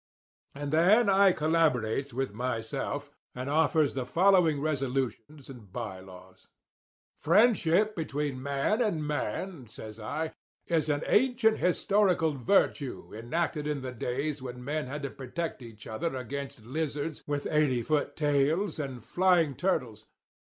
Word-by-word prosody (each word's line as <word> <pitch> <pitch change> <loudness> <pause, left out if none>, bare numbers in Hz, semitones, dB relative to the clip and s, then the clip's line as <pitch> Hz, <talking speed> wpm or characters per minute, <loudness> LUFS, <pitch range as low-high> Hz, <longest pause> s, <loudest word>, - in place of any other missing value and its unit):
"And 145 +1 -4
then 200 +8 +5
I 195 0 +6
collaborates 150 -6 +1
with 130 -2 -2
myself, 115 -1 -3 0.2
and 125 +1 -5
offers 155 -1 +3
the 130 - -2
following 170 +1 +4
resolutions 135 -2 -2
and 120 -8 -12
by 105 -4 -5
laws: 95 0 -15 0.7
"'Friendship 210 +1 +3
between 145 -4 -3
man 140 - 0
and 170 -10 0
man,' 150 0 -3
says 110 0 -10
I, 155 +9 -3 0.3
'is 160 -3 0
an 145 +1 0
ancient 240 -2 +3
historical 180 -2 +2
virtue 140 - 0
enacted 150 +7 -2
in 150 -2 -2
the 130 -1 -5
days 135 +5 -3
when 125 -1 -7
men 150 0 -2
had 145 +2 -5
to 140 - -3
protect 140 +3 -5
each 110 -3 -11
other 135 +7 -3
against 130 -2 -6
lizards 150 +2 -3
with 145 -1 -2
eighty 140 -6 +2
foot 150 +1 0
tails 150 +5 +1
and 130 -5 -5
flying 175 -5 +3
turtles. 125 - -2
145 Hz, 135 wpm, -29 LUFS, 125-165 Hz, 0.7 s, I